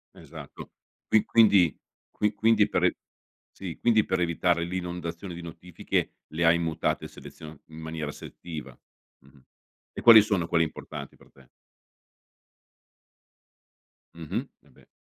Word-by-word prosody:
Esatto. - - -11 0.4
Qui 110 - +4
quindi 100 -8 +4 0.3
qui 105 0 -1
quindi 105 0 +3
per - - -1
e - - +2 0.6
sì, 90 -5 -8
quindi 110 -3 +3
per 95 -1 -1
evitare 85 0 +1
l'inondazione 90 0 -5
di 85 - -8
notifiche, 85 +1 -4 0.2
le 85 +2 -2
hai 85 +1 +5
mutate 80 -1 -2
selezio 80 -2 -12
in 80 0 -13
maniera 80 -2 -5
selettiva. 75 -7 -9 0.4
Mh-mh, 70 +1 -22 0.5
e - - -7
quali 115 -3 +9
sono 95 -6 -1
quelle 80 0 +2
importanti 75 -2 -8
per - - -22
te? 65 -2 -21 2.7
Mh-mh, 80 -2 -5 0.2
eh 75 - -24
beh. - - -22
85 Hz, 130 wpm, -27 LUFS, 80-95 Hz, 2.7 s, quali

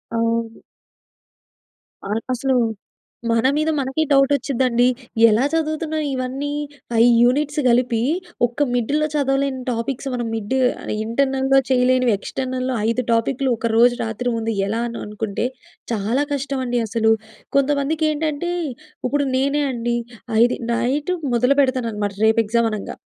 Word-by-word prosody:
అవును. 230 0 -1 1.5
ఆ! - - -7 0.3
అసలు 265 +1 0 0.8
మన 230 +2 +3
మీద 310 +1 +1
మనకే 270 +4 0
డౌట్ 275 0 +4
వచ్చిద్దండి. 250 -2 +1 0.4
ఎలా 220 +5 +3
చదువుతున్నాం, 315 -1 -1
ఇవన్నీ? 260 +3 -3 0.4
5 230 +1 +5
యూనిట్స్ 290 +4 +2
కలిపి, 235 -1 +2 0.5
ఒక్క 245 +5 -1
మిడ్‌లో 290 +6 +1
చదవలేని 270 -2 0
టాపిక్స్ 240 +4 -3
మనం 240 -2 -2
మిడ్ 225 +4 -2 0.5
ఇంటర్నల్‍లో 270 +2 +1
చేయలేనివి. 255 -2 +3
ఎక్స్టర్నల్‍లో 255 +2 -3
5 240 +2 0
టాపిక్‌లు, 260 +3 0
ఒక 230 - -1
రోజు 240 +1 +5
రాత్రి 225 +2 -2
ముందు 225 0 -2
ఎలానో 230 +2 -3
అనుకుంటే, 210 +1 -3 0.5
చాలా 230 +6 0
కష్టమండి 260 -3 -1
అసలు. 225 0 +2 0.5
కొంతమందికి 290 +3 +1
ఏంటంటే, 310 +3 -2 0.6
ఇప్పుడు 285 +2 0
నేనే 280 +3 +1
అండి, 240 0 -1 0.4
ఆ! - - -3
ఇది 245 - -1 0.2
నైట్ 265 +8 0 0.2
మొదలు 250 +4 +3
పెడతానన్నమాట, 230 -6 -1
రేపు 220 +1 +4
ఎగ్జామ్ 230 +1 +1
అనంగా. 210 -2 -5
255 Hz, 120 wpm, -21 LUFS, 230-275 Hz, 1.5 s, 5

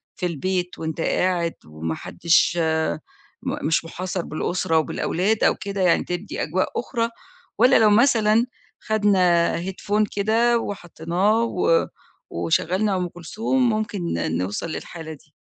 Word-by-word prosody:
في - - -3
البيت 180 +2 -2
وأنت 160 0 -3
قاعد 175 -2 +1
وما 80 +1 -4
حدش 170 +1 +2 0.9
م 260 - -3
مش 165 +1 +1
محاصر 180 +2 -4
بالأسرة 160 +1 -1
وبالأولاد 185 +6 0
أو - - +4
كده 200 -1 -4
يعني 180 -2 +3
تدي 180 +3 -4
أجواء 185 +5 0
أخرى، 235 -1 -1 0.5
والّا 250 - +5
لو 215 -1 +5
مثلًا 225 0 +4 0.3
خدنا 185 -6 +2
Headphone 205 +2 0
كده 230 +4 +3
وحطّيناه 195 +3 -1
و 180 -6 +2 0.4
وشغّلنا 180 - 0
أم 180 -1 -1
كلثوم 225 +9 -1
ممكن 215 -2 -2 0.4
نوصل 100 - -3
للحالة 160 0 -7
دي؟ 150 +1 -18
185 Hz, 125 wpm, -23 LUFS, 165-215 Hz, 0.9 s, والّا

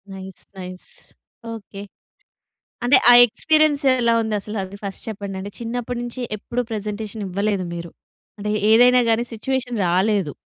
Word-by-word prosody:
Nice 190 0 -9
nice. 185 0 -8 0.7
Okay. 200 -2 -9 1.0
అంటే 260 +2 +6
ఆ - - +10
experience 310 +4 +2 0.2
ఎలా 235 -1 +3
ఉంది? 220 -1 -2
అసలు 210 +2 -6
అది 190 +2 -10
ఫస్ట్ 195 - -5
చెప్పండి? 200 -2 -5
అంటే 200 +2 -6
చిన్నప్పటి 240 +1 -4
నుంచి 240 +1 -5 0.2
ఎప్పుడు 240 +4 -3
ప్రజెంటేషన్ 210 0 -4
ఇవ్వలేదు 200 +1 -1
మీరు. 170 0 -7 0.5
అంటే 210 +1 -3 0.2
ఏదైనా 250 +2 +6
గాని 230 +2 +2
స్విచ్యువేషన్ 245 +1 -2
రాలేదు. 190 -2 +1
215 Hz, 140 wpm, -21 LUFS, 195-240 Hz, 1.0 s, ఆ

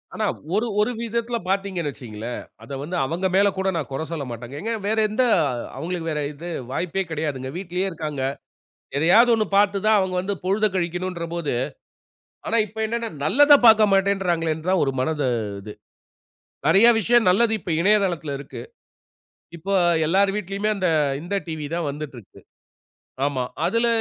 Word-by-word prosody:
ஆனா 215 - -1 0.3
ஒரு 225 +3 +1
ஒரு 230 - +1
விதத்தில 235 +1 -2
பார்த்தீங்கனு 190 -5 -1
வச்சுங்களேன், 120 -3 -7 0.2
அத 140 - -6
வந்து 175 +5 -5
அவங்க 170 +7 -3
மேலே 200 +1 +5
கூட 190 0 -1
நான் 160 -4 -3
குறை 135 +4 -3
சொல்லமாட்டேங்க. 125 -5 -6
எங்க 225 +2 -3 0.2
வேற 220 - 0
எந்த 245 +5 +1 0.5
அவங்களுக்கு 165 -1 -3
வேற 150 -1 -1
இது 160 +4 -9 0.2
வாய்ப்பே 180 +5 -1
கிடையாதுங்க. 145 -5 -3
வீட்லயே 185 +1 -2
இருக்கிறாங்க. 155 -6 -4 0.7
எதையாவது 220 +11 +5
1 215 -2 +1
பார்த்து 200 -1 +3
தான் 215 -1 +5
அவங்க 190 -1 -1
வந்து 200 +2 -2
பொழுதக் 200 +1 +1
கழிக்கனும்ன்ன்ற 175 0 -2
போது, 170 -4 -2 0.9
ஆனா, 230 - +1
இப்போ 220 +1 -11
என்னனா 230 +1 -2 0.2
நல்லதப் 285 - +6
பார்க்கமாட்டேன்றாங்களேனு 195 -6 +3
தான் 190 -2 +3
ஒரு 135 - 0
மனது 150 0 0 0.3
இது. 105 +1 -9 0.9
நிறைய 215 +5 +6
விஷயம் 235 0 +3
நல்லது 220 +5 +3
இப்போ 175 - -3
இணையதளத்தில 180 -7 +1
இருக்கு. 140 - -9 0.9
இப்போ 195 +5 -3 0.3
எல்லார் 195 +4 +3
வீட்டிலுமே 200 +1 -2
அந்த, 185 -2 0 0.3
இந்த 175 +4 -4
டிவி 155 -2 -5
தான் 170 -3 -1
வந்துட்டு 150 0 -7
இருக்கு, - - -16 0.9
ஆமா. 130 -3 -1 0.2
அதில 230 +1 +2
185 Hz, 145 wpm, -23 LUFS, 155-210 Hz, 0.9 s, நல்லதப்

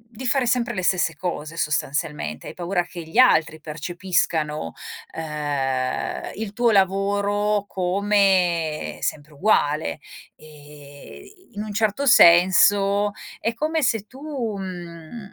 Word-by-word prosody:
di 260 +4 -6
fare 260 0 +2
sempre 240 0 0
le 185 - -3
stesse 175 -3 +1
cose 165 -2 -5
sostanzialmente. 145 - -2
Hai - - -8
paura 175 0 -1
che 175 0 -9
gli 160 +3 -11
altri 160 -10 +4
percepiscano, 155 - -2 0.4
uhm, 145 -5 -2
il 215 -2 -5
tuo 235 +2 +2
lavoro 200 +1 +1
come 185 -4 +1
sempre 150 +1 -4
uguale 145 - +1 0.4
e 150 - -14
in 205 - -4
un 215 -1 -6
certo 220 +5 0
senso 200 0 +5 0.3
è 230 - -1
come 310 +5 -1
se 225 -5 +1
tu, 255 - -15
uhm 195 - -6
185 Hz, 115 wpm, -23 LUFS, 155-210 Hz, 0.4 s, senso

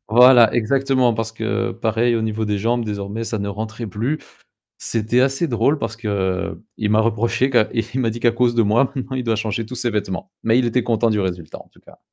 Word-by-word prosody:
voilà, 120 0 +7
exactement, 130 0 +2
parce 115 0 -3
que 115 +1 -2
pareil, 115 +1 0
au 115 - -1
niveau 110 0 -2
des 105 -1 -1
jambes, 115 +3 0
désormais, 105 +2 -4
ça 110 - -3
ne 100 0 -3
rentrait 110 +3 -5
plus. 115 +10 -2 0.6
C'était 115 +2 0
assez 135 +5 0
drôle 125 +6 +1
parce 115 -3 -4
qu'il 100 -4 -2 0.3
m'a 110 - +4
reproché 115 +3 +1
qu'à 120 -4 +4
c - - -13
et 115 - 0
il 130 - 0
m'a 115 -3 +1
dit 115 +2 -6
qu'à 120 -1 +3
cause 120 0 +1
de 115 - +3
moi, 120 +6 +2
maintenant, 130 -1 -4
il 125 - -3
doit 115 -1 0
changer 110 +1 -2
tous 125 +2 -8
ses 120 -1 -1
vêtements. 100 -3 -4
Mais 115 +1 +3
il 130 - +2
était 120 +1 +1
content 115 -1 +1
du 105 -1 +1
résultat 90 -4 -4
en - - -16
tout - - -23
cas. - - -18
115 Hz, 235 wpm, -20 LUFS, 110-120 Hz, 0.6 s, voilà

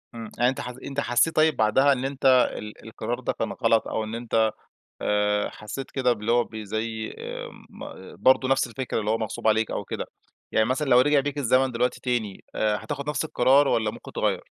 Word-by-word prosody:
امم، 115 -1 -7
يعني 120 +1 +4
أنت 130 - -3
حس 125 0 -6
أنت 140 0 -4
حَسيت 140 +4 +2
طيب 155 0 +4
بعدها 135 +6 +4
إن 130 0 -3
أنت 135 0 -5
ال 130 -1 +5 0.2
ال - - -17
القرار - - -4
ده - - -2
كان - - -3
غلط، 115 -1 +1
أو 110 - -2
إن 110 +1 -5
أنت 115 -2 +1 0.5
آآ 105 0 +1
حَسيت 120 +6 -7
كده 125 -2 +2
باللي 110 0 -2
هو 120 0 +4
بي 110 -2 -8
زي 110 +1 -4
آآ - - -6 0.2
ما 95 - -10
برضه 130 0 +4
نَفْس 135 -1 +2
الفكرة، 120 0 -3
اللي 105 0 -1
هو 110 - +2
مَغصوب 110 0 -3
عليك 110 0 +2
أو - - -3
كده، - - -4 0.5
يعني 110 - +3
مثلًا 135 +4 -1
لو 125 0 +7
رجَع 145 +2 +4
بيك 145 +1 -3
الزمن 130 -1 +2
دلوقتي 125 +1 -1
تاني، 120 -6 -2
آآ 105 -1 +1
هتاخُد 145 -1 -4
نَفْس 150 - -1
القرار، 140 0 +4
والّا 110 -4 +1
ممكن - - -11
تغَيَّر؟ - - -1
120 Hz, 215 wpm, -25 LUFS, 110-135 Hz, 0.5 s, لو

